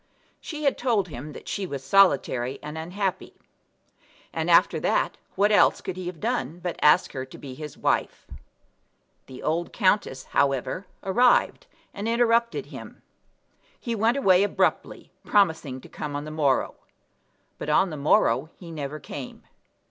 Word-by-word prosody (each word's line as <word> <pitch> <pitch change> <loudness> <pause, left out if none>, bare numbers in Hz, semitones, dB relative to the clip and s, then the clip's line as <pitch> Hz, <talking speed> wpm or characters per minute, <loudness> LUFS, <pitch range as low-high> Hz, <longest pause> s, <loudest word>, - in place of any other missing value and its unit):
She 305 -2 -7
had 280 - +1
told 220 -7 +1
him 145 +1 -8
that - - -11
she 195 -2 -3
was 140 -5 -6
solitary 135 -6 +3
and 150 +1 -7
unhappy; 180 +4 -3 1.0
and - - -2
after - - +5
that - - 0 0.2
what 205 +2 +3
else 205 - +5
could 185 - -5
he 185 -1 -6
have 180 -3 -6
done 145 +4 -2
but 175 -1 -5
ask 150 - +5
her 130 - -4
to 130 - -13
be 135 -3 -9
his 150 +2 -9
wife? - - -1 1.0
The 130 - -10
old 165 +2 -1
countess, 185 - +1
however, 140 +7 0 0.2
arrived, 240 +6 +3 0.3
and 205 +2 -4
interrupted 235 0 +2
him. - - -11 0.8
He 235 - -3
went 230 +4 +2
away 190 -8 +4
abruptly, 205 - -1
promising 160 -9 +1
to - - -13
come 150 -2 -6
on 145 +1 -4
the 155 - -7
morrow; 145 -4 +1 0.9
but - - -5
on 175 +4 +3
the - - -5
morrow 140 -1 +2
he 170 -3 -11
never 150 -1 -5
came. 135 -1 -8
165 Hz, 155 wpm, -25 LUFS, 140-200 Hz, 1.0 s, after